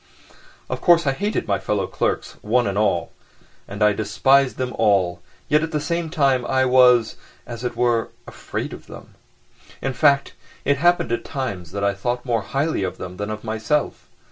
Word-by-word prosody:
Of - - -4
course, 170 -2 +5
I 135 - +3
hated 205 +10 -2
my 100 - +1
fellow 100 -3 -1
clerks - - -2
one 120 +3 +1
and 100 - -2
all, 100 -5 0 0.6
and 100 +1 -3
I 105 0 +5
despised 135 +6 +2
them 125 -1 -3
all, 100 -5 +2 0.3
yet 150 +1 +3
at 160 - -2
the 155 -2 -1
same 170 +2 -2
time 135 -6 +2
I 130 -1 +2
was, 125 -3 +4 0.3
as 120 0 -8
it 120 -1 -3
were, 120 -1 +1 0.2
afraid - - -6
of - - -11
them. - - -12 0.7
In 135 - -2
fact, 140 0 +3 0.3
it 140 +1 +2
happened 175 -5 +2
at 120 - -1
times 100 - -5
that 100 - -4
I 100 0 +2
thought 120 +6 -3
more 115 -3 0
highly 140 +7 -1
of 95 -1 -3
them 90 0 -8
than 105 +1 -4
of 110 0 -5
myself. 110 +6 -2
120 Hz, 185 wpm, -22 LUFS, 105-140 Hz, 0.7 s, course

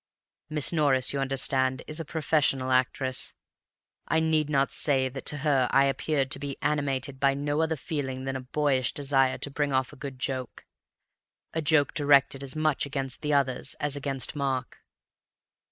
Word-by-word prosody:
Miss 150 +1 +3
Norris, 140 -5 +2
you 140 - -1
understand, 130 -1 +2
is 150 +2 -5
a - - -3
professional 145 -4 +1
actress. 130 0 0 0.7
I 160 - +2
need 160 -2 +1
not 140 -2 +1
say 135 -3 +2
that 135 +1 -8
to 150 - +1
her 135 -4 +3
I 135 0 +4
appeared 135 -1 -1
to - - 0
be 140 -1 -5
animated 140 -2 -1
by 135 0 +3
no 145 +2 -1
other 160 0 0
feeling 135 -3 -4
than 135 0 -3
a 130 - -4
boyish 130 -1 0
desire 135 -2 +2
to 140 - -4
bring 145 0 -1
off 130 +1 0
a - - -11
good 135 -2 -7
joke—a 130 +4 -8
joke 150 -2 +3
directed 140 -2 +3
as 135 +1 -6
much 155 -3 0
against 135 -2 -4
the 150 -1 -1
others 135 -3 0
as 145 -1 -2
against 140 +1 -1
Mark. 135 -3 -3
140 Hz, 170 wpm, -27 LUFS, 130-150 Hz, 0.7 s, I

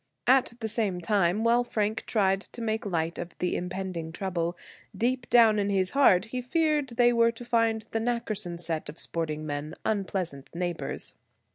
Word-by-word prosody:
At 260 -2 +4
the 220 - -1
same 210 -5 +1
time, 195 +2 +1
while 235 +1 +4
Frank 215 -2 -2
tried 195 -4 +2
to 240 - -7
make 220 -1 -1
light 165 -2 -1
of 175 0 -7
the 180 - -1
impending 180 -2 -4
trouble, 175 -1 -2 0.4
deep 245 +3 0
down 225 -3 +6
in 200 0 0
his 190 -2 +1
heart 220 -9 +5
he 250 +2 -4
feared 300 +1 +1
they 240 0 +5
were 230 0 +4
to 235 +1 -10
find 230 -2 +1
the 225 - 0
Nackerson 215 -6 -2
set 165 -3 -3
of 155 - -9
sporting 155 -2 -2
men 145 +1 -4
unpleasant 185 -9 -2
neighbors. 175 -1 -2
205 Hz, 170 wpm, -28 LUFS, 175-230 Hz, 0.4 s, down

